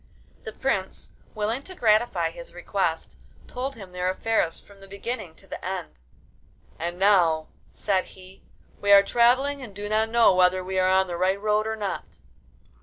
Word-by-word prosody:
The 220 - -5
prince, 200 -6 -3 0.2
willing 215 +4 -1
to 370 +6 -12
gratify 225 -3 +2
his - - -12
request, - - -2 0.3
told 265 +2 -5
him 195 -4 -11
their 180 0 -1
affairs 190 -3 0
from 200 -1 -19
the 195 - -14
beginning 200 -3 -6
to - - -16
the - - -8
end. - - -4 0.9
'And 175 +2 -3
now,' 175 -5 +3 0.2
said 190 -3 0
he, 185 0 -16 0.4
'we 205 - +2
are 200 0 +8
travelling, 260 +6 +2
and 220 -6 -10
do 205 +1 -5
not 220 +1 +1
know 230 -3 +5
whether 185 0 +3
we 190 +1 -2
are 185 0 +3
on 190 0 +4
the 175 -2 -5
right 190 +2 +1
road 210 +1 +1
or 220 - -2
not. 195 - -5
200 Hz, 175 wpm, -25 LUFS, 185-225 Hz, 0.9 s, are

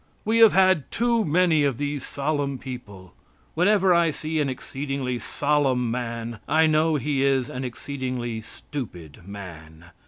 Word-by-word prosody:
We 225 +2 +2
have 225 -2 +8
had 185 -5 +3
too 235 -1 +1
many 165 -2 +3
of 140 -4 +1
these 145 -1 -3
solemn 140 -1 -2
people. 105 -8 -9 0.4
Whenever 190 +2 +4
I 170 -1 +4
see 155 +1 -3
an 145 -2 +1
exceedingly 130 -1 -4
solemn 135 -2 0
man, 115 -2 -4
I 160 +2 +4
know 155 0 +3
he 140 0 0
is 135 -2 +2
an 125 - -5
exceedingly 125 -2 -4
stupid 90 - -9
man. 85 -4 -10
140 Hz, 145 wpm, -24 LUFS, 120-155 Hz, 0.4 s, have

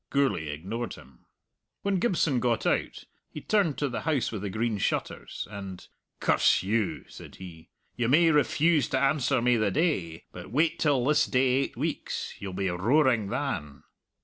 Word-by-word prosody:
Gourlay 135 - +1
ignored 95 +11 -5
him. 65 -1 -18 0.6
When 200 -2 +1
Gibson 170 - +1
got 120 -2 0
out - - -1 0.2
he - - -8
turned 185 -3 +1
to 145 - 0
the 120 - -4
House 145 -7 0
with 105 -4 -5
the 100 - -3
Green 110 +1 -1
Shutters, - - -3
and 100 -3 -8 0.3
"Curse - - +3
you!" 105 +1 -1
said - - -12
he; 85 -3 -12 0.3
"you 120 -2 0
may 165 +4 +5
refuse 150 0 +2
to - - +1
answer 135 -3 +1
me 125 -1 +3
the 110 -2 +1
day, 95 - -1
but - - -10
wait 155 +8 +1
till 140 -5 +2
this 150 +2 +3
day 130 +1 +2
eight 135 +2 0
weeks. - - -3
You'll 100 -2 -6
be 95 +1 -1
roaring 115 - +2
than." 90 - -4
120 Hz, 170 wpm, -27 LUFS, 100-145 Hz, 0.6 s, may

